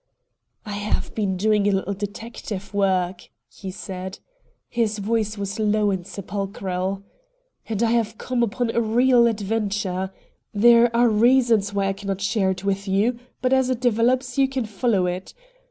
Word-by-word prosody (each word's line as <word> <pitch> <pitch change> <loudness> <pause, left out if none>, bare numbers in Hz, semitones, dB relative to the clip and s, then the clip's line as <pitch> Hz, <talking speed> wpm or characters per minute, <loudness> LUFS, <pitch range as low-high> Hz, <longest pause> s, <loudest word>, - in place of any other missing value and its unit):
"I 210 - -6
have 205 +1 -2
been 195 -4 -1
doing 210 +1 +2
a - - +4
little 195 0 -1
detective 205 -1 -6
work," 190 -2 0 0.2
he 190 - -9
said. 185 0 -6 0.5
His 225 -3 0
voice 215 0 -1
was 200 +1 -4
low 210 -1 +2
and 185 -2 -3
sepulchral. 195 -1 -4 0.7
"And 220 0 0
I 225 - +2
have 225 -2 0
come 250 -1 -2
upon 235 +1 0
a 235 - +1
real 240 +2 +4
adventure. 205 -3 -1 0.4
There 235 +2 +6
are 240 +1 +5
reasons 230 -2 +3
why 200 -1 +1
I - - 0
cannot 195 -1 -4
share 200 -1 +1
it 185 0 -3
with 195 0 -1
you, 215 +6 +1 0.2
but 255 +1 +3
as 265 -1 +3
it 255 -2 0
develops 245 +2 +1
you 270 - +5
can 265 -3 -2
follow 210 -2 +1
it. 180 +1 -4
210 Hz, 160 wpm, -23 LUFS, 195-235 Hz, 0.7 s, There